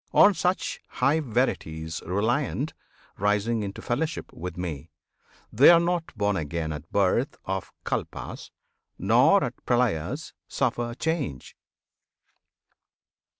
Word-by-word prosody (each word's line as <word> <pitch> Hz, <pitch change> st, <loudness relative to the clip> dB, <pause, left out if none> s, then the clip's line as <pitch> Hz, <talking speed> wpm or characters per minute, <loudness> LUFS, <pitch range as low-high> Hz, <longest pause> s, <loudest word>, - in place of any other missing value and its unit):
On 205 Hz, -, +8 dB
such 180 Hz, 0 st, -1 dB
high 150 Hz, +3 st, +2 dB
verities 85 Hz, -, -1 dB
Reliant, 120 Hz, -, 0 dB, 0.5 s
rising 105 Hz, +3 st, +1 dB
into 100 Hz, -1 st, -5 dB
fellowship 155 Hz, +7 st, -2 dB
With 90 Hz, 0 st, -6 dB
Me, 80 Hz, -3 st, -5 dB, 0.6 s
they 130 Hz, +7 st, +8 dB
are 170 Hz, -1 st, +8 dB
not 170 Hz, -1 st, -1 dB
born 105 Hz, -1 st, +1 dB
again 80 Hz, 0 st, -3 dB
at 75 Hz, +2 st, -9 dB
birth 100 Hz, +7 st, +2 dB
Of 95 Hz, 0 st, -3 dB
Kalpas, -, -, -4 dB, 0.5 s
nor 120 Hz, -, +5 dB
at 125 Hz, -1 st, -5 dB
Pralyas 120 Hz, -, 0 dB
suffer 120 Hz, -2 st, -1 dB
change! 145 Hz, -, -3 dB
115 Hz, 110 wpm, -26 LUFS, 90-140 Hz, 0.6 s, On